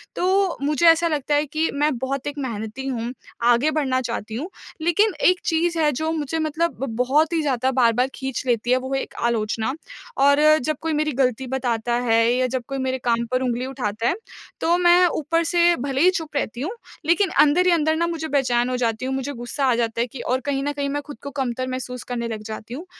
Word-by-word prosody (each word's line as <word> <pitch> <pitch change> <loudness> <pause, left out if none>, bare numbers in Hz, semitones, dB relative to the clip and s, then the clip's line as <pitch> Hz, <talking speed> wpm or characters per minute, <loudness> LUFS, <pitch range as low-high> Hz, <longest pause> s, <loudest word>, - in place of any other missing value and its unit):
तो 380 0 +1
मुझे 300 +3 +1
ऐसा 330 +1 +5
लगता 295 -2 0
है 295 +1 +2
कि 310 +3 -1
मैं 290 -1 +1
बहुत 265 +2 -3
एक 290 0 -4
मेहनती 230 0 -5
हूँ, 240 -2 -3 0.3
आगे 240 +5 +3
बढ़ना 270 -4 0
चाहती 230 -3 -4
हूँ। 300 +10 -4 0.3
लेकिन 370 +6 +2 0.2
एक 365 -1 +1
चीज़ 335 +1 +1
है 305 -2 +3
जो 315 +4 -2
मुझे 320 0 -2
मतलब 315 +2 -1
ब - - -1
बहुत 290 +7 +2
ही 330 - +2
ज़्यादा 260 -3 0
बार-बार 245 -1 +3
खींच 265 -2 -4
लेती 240 0 +1
है 255 - +5
वो 260 +1 -4
है 270 - +1
एक - - -8
आलोचना। 225 +1 0 0.4
और 280 +1 +5 0.2
जब 305 +3 -2
कोई 325 -1 -1
मेरी 305 0 0
ग़लती 255 0 0
बताता 240 -3 -1 0.2
है 225 0 +4
या 255 +1 +1
जब 255 0 -3
कोई 275 - -4
मेरे 260 0 0
काम 235 0 +1
पर 255 - +1
उँगली 245 0 -1
उठाता 225 -4 -2
है 330 - +2 0.5
तो 340 +1 +3
मैं 355 0 +5
ऊपर 330 0 0
से 345 +1 +3
भले 270 0 -2
ही 360 - +7
चुप 320 -5 -5
रहती 245 -3 -2
हूँ, 320 +8 -2 0.3
लेकिन 355 +4 +3
अंदर 305 +5 +4
ही 365 - +4
अंदर 315 -2 +2
ना 340 +1 +1
मुझे 325 -2 -3
बेचैन 250 -4 +1
हो 255 - -1
जाती 230 0 -1
हूँ, 265 - -2
मुझे 270 +2 -3
गुस्सा 245 +3 -3
आ 255 -2 +3
जाता 230 -1 -1
है 240 - 0
कि 250 +2 -10
और 255 +1 0
कहीं 275 -1 -1
न 290 - -1
कहीं 285 -1 -2
मैं 290 +1 -2
ख़ुद 290 - -8
को 280 - -5
कमतर 255 -2 -2
महसूस 255 -1 -5
करने 235 -1 -2
लग 220 -2 -5
जाती 220 +1 -7
हूँ। 310 +8 -7
270 Hz, 230 wpm, -22 LUFS, 245-315 Hz, 0.5 s, ही